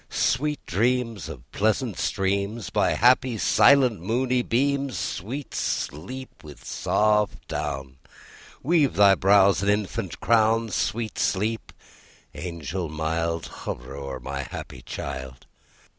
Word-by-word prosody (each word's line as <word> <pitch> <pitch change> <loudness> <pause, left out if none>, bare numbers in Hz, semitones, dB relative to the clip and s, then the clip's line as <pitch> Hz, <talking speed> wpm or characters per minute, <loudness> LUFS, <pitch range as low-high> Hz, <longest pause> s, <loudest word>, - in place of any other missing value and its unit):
Sweet 150 +3 0
dreams 115 - 0
of 65 -6 -9
pleasant 110 +1 0
streams 100 +2 -1
By - - +2
happy, 125 0 +4
silent, 125 -3 +4
moony 125 +6 +1
beams! 140 +2 0
Sweet 125 +10 -4
Sleep, 130 - -4
with 75 -3 -12
soft 105 -1 +1
down 65 -1 -4 0.7
Weave 150 -2 +3
thy 100 -1 +7
brows 95 0 +4
an 100 - +1
infant 105 -1 -1
crown! 115 0 +3
Sweet 110 -1 -2
Sleep, 110 +4 -1 0.6
angel 85 0 -5
mild, 80 +2 -2
Hover 65 +3 -7
o'er 70 -1 -6
my 70 +1 -4
happy 65 -1 -8
child! 65 0 -7
105 Hz, 115 wpm, -25 LUFS, 80-120 Hz, 0.7 s, thy